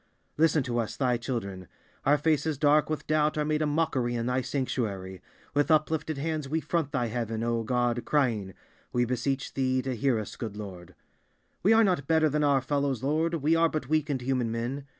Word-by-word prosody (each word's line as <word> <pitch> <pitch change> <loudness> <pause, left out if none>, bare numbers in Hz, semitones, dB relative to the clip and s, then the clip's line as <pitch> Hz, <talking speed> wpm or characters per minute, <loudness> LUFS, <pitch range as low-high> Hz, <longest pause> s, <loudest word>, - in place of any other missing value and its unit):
Listen 155 -2 +3
to 120 -2 -1
us, 115 - -3
Thy 125 -3 +2
children: 100 -7 -4 0.4
our 145 +1 +5
faces 155 0 +1
dark 150 +2 +3
with 155 - -3
doubt 155 0 +1
are 150 - +1
made 155 0 0
a 155 - +2
mockery 145 -6 0
in 115 -1 -2
Thy 125 +1 +1
sanctuary. 100 -9 -3 0.3
With 145 +3 +2
uplifted 155 -1 +1
hands 155 -1 -2
we 160 +3 +1
front 160 -3 -1
Thy 130 -5 0
heaven, 115 -1 -3
O 115 0 0
God, 120 +1 0
crying:We 120 - -1
beseech 130 +2 -2
Thee 130 -1 0
to 130 -1 -2
hear 130 0 +1
us, 105 -2 -5
good 110 -3 -5
Lord! 95 -4 -9 0.7
We 205 - +4
are 225 0 +6
not 180 -9 +1
better 160 -1 +3
than 150 +1 0
our 140 -2 +3
fellows, 140 -2 -1
Lord, 160 +4 +1
we 160 +1 +2
are 165 0 +4
but 155 -5 -4
weak 155 -1 +1
and 135 -3 -1
human 125 -3 0
men. 125 +5 -3
135 Hz, 195 wpm, -28 LUFS, 120-155 Hz, 0.7 s, are